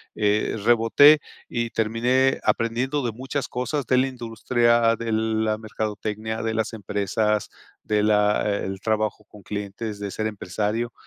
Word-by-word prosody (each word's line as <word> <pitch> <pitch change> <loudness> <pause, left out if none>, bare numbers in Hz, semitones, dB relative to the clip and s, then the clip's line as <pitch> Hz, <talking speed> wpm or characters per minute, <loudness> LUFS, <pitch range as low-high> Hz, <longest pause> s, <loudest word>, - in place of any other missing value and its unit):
eh, 105 +1 +1
reboté 120 +6 +6 0.3
y 120 -1 -2
terminé 125 +4 +1
aprendiendo 125 +5 0
de 120 - -1
muchas 135 +4 -4
cosas 125 +3 -3
de 130 - +3
la 130 +1 +3
industria, 120 -1 +1
de 115 -1 -4
la 110 0 0
mercadotecnia, 110 0 -4
de 115 - -1
las 110 0 -1
empresas, 105 +1 -1 0.3
de 105 -1 +1
la 105 0 +3
e 100 0 -1
el 95 0 -5
trabajo 110 -1 -1
con 105 -1 -15
clientes, 105 +1 -5
de 100 -1 -4
ser 110 - -2
empresario, 105 +3 -3
110 Hz, 145 wpm, -24 LUFS, 105-120 Hz, 0.3 s, reboté